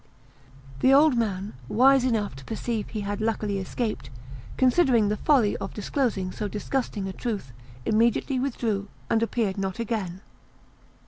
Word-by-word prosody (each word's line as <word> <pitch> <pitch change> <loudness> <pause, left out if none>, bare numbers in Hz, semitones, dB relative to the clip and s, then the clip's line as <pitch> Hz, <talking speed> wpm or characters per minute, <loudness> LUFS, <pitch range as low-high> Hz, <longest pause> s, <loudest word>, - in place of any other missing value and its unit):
The 260 - +4
old 285 0 +6
man, 205 -4 -1 0.2
wise 265 +3 +5
enough 215 - 0
to 135 - -10
perceive 225 -1 -3
he 215 - -4
had 205 +1 -3
luckily 215 -2 -1
escaped, 215 +4 -3 0.5
considering 255 -5 +4
the 210 - 0
folly 245 -8 +3
of 195 - -6
disclosing 210 -4 -1
so 210 - -3
disgusting 210 -1 -2
a 190 - -5
truth, 205 - -4 0.3
immediately 235 +4 +2
withdrew, 230 -6 -1 0.2
and 225 - +3
appeared 220 -4 0
not 190 -1 -2
again. 205 -6 -3
220 Hz, 140 wpm, -26 LUFS, 200-245 Hz, 0.5 s, old